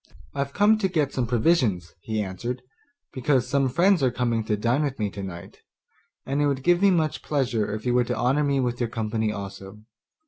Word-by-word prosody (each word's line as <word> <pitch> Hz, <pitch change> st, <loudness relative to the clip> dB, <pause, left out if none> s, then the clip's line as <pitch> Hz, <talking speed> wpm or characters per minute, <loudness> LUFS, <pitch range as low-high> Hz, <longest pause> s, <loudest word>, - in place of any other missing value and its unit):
'I've 140 Hz, 0 st, -3 dB
come 210 Hz, +2 st, +4 dB
to 195 Hz, -, +2 dB
get 155 Hz, -6 st, 0 dB
some 125 Hz, -3 st, -1 dB
provisions,' 115 Hz, -, +1 dB
he 110 Hz, +1 st, -2 dB
answered, 120 Hz, +7 st, -5 dB, 0.5 s
'because 130 Hz, -1 st, +1 dB
some 135 Hz, 0 st, +1 dB
friends 180 Hz, +5 st, +3 dB
are 130 Hz, -, +3 dB
coming 120 Hz, -2 st, -1 dB
to 105 Hz, -, 0 dB
dine 120 Hz, +7 st, +1 dB
with 140 Hz, -3 st, -2 dB
me 105 Hz, -3 st, -2 dB
today, 95 Hz, -4 st, -7 dB, 0.7 s
and 140 Hz, +2 st, -1 dB
it 145 Hz, -, +3 dB
would 135 Hz, -2 st, -1 dB
give 175 Hz, +2 st, +3 dB
me 200 Hz, -, +6 dB
much 160 Hz, -5 st, +1 dB
pleasure 125 Hz, -8 st, -1 dB
if 110 Hz, +2 st, -5 dB
you 125 Hz, -, +1 dB
were 125 Hz, 0 st, +3 dB
to -, -, -2 dB
honour 135 Hz, +4 st, +2 dB
me 140 Hz, -1 st, +1 dB
with 120 Hz, -2 st, -1 dB
your 120 Hz, -2 st, -1 dB
company 110 Hz, -1 st, -1 dB
also. 100 Hz, 0 st, -8 dB
125 Hz, 205 wpm, -25 LUFS, 110-145 Hz, 0.7 s, me